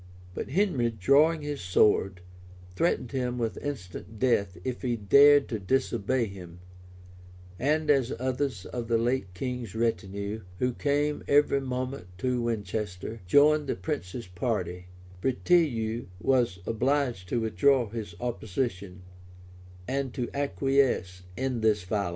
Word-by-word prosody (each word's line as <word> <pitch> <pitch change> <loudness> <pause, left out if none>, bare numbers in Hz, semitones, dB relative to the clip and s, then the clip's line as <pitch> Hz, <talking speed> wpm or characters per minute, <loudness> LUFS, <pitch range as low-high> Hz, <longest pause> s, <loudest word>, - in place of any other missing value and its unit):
But - - -5
Henry, 145 - +1
drawing 145 - +3
his 145 -1 -4
sword, 95 0 +2 0.5
threatened 125 - 0
him 125 -2 -2
with 115 -2 -2
instant 110 -6 -6
death 100 -7 +1
if 125 -1 -4
he 125 -3 0
dared 140 +7 +6
to 110 - -2
disobey 120 +2 0
him; 90 -4 -10 1.0
and 155 +4 +1
as 135 -4 +2
others 130 -5 -2
of 120 -2 -5
the 115 0 +2
late 115 -4 0
king's 125 0 -4
retinue, 105 -2 -2 0.2
who 125 +3 0
came 145 +2 0
every 145 -1 +4
moment 130 -4 -4
to 125 +4 0
Winchester, 105 -2 -3
joined 150 +6 +5
the - - -1
prince's 90 +4 -4
party, 90 -2 -3 0.3
Breteuil 125 - +1
was 120 -8 +2
obliged 120 -5 0
to 120 - 0
withdraw 125 +2 +3
his 105 -5 -6
opposition, 100 -5 -3 0.8
and 135 -2 -2
to 125 -3 -3
acquiesce 135 -9 +1 0.2
in 130 -3 -1
this 105 -3 +2
violence. 100 0 -1
120 Hz, 125 wpm, -28 LUFS, 100-135 Hz, 1.0 s, dared